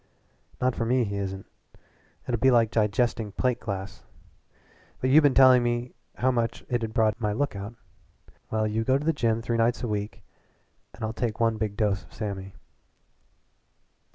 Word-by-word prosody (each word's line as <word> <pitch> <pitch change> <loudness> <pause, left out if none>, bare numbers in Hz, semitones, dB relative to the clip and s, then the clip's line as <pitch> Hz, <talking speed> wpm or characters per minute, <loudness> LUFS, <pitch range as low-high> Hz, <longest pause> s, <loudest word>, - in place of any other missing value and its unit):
"Not 130 0 +1
for - - -1
me 125 +2 +2
he 100 -2 -3
isn't. 95 -1 -4 0.8
It'll 120 -3 -1
be 130 - +4
like 115 -3 +4
digesting 110 0 0
plate 125 +1 0
glass. 95 -2 -6 1.0
But 130 - 0
you 155 +3 +8
been 145 -3 +3
telling 130 -2 +7
me 120 +1 -2 0.2
how 130 +1 +2
much 115 -2 -2
it'd 115 -3 -1
broaden 110 -2 +2
my 105 -2 0
lookout. 110 -4 -3 0.7
Well, 110 0 0
you 110 +1 -1
go 130 +3 +3
to 145 - -5
a 165 - +3
gym 115 -4 0
three 115 0 -1
nights 115 +2 +1
a - - -1
week 105 -1 -4 0.7
and 115 - -9
I'll 110 - -3
take 115 -1 -3
one 115 -1 +2
big 105 -2 -3
dose 100 -3 0
of - - -20
Sammy." 100 -3 -5
115 Hz, 170 wpm, -26 LUFS, 105-125 Hz, 1.0 s, you